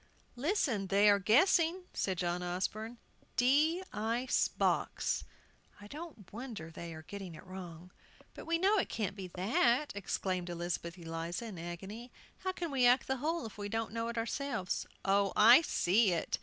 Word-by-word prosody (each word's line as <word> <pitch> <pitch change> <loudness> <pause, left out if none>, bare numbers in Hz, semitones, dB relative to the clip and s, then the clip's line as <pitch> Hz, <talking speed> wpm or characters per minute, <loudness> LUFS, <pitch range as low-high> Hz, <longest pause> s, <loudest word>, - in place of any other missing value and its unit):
"Listen, 255 - 0
they 200 +2 +5
are 200 - +4
guessing," 330 - +4
said 190 -2 -1
John 175 0 -1
Osborne. 205 +6 -3 0.4
"'D 300 +8 +3
ice 230 +4 +1
box.' - - 0 0.6
I 205 - -12
don't 285 - -10
wonder 220 -9 -7
they 165 0 -7
get 200 +3 -7
it 175 -4 -9
wrong." 180 -2 -9 0.4
"But - - -10
we 335 0 +2
know 395 +4 +3
it - - -1
can't 205 -3 -2
be 190 -2 -6
that!" 235 +9 +2
exclaimed 185 -2 -2
Elizabeth 170 0 -4
Eliza, 165 +4 -4
in 205 -7 -7
agony. 190 +8 -7 0.3
"How 375 - -1
can 345 -3 -4
we 255 -3 +4
act 250 +2 +4
the 265 - -1
whole 320 +4 -1
if 215 -1 -9
we 205 0 -4
don't 225 +1 -2
know 230 0 -2
it 235 0 -4
ourselves?" 230 -4 -2 0.2
"Oh, 195 0 +3
I 235 +7 +9
see 205 - +3
it!" 165 - -1
215 Hz, 165 wpm, -33 LUFS, 185-260 Hz, 0.6 s, I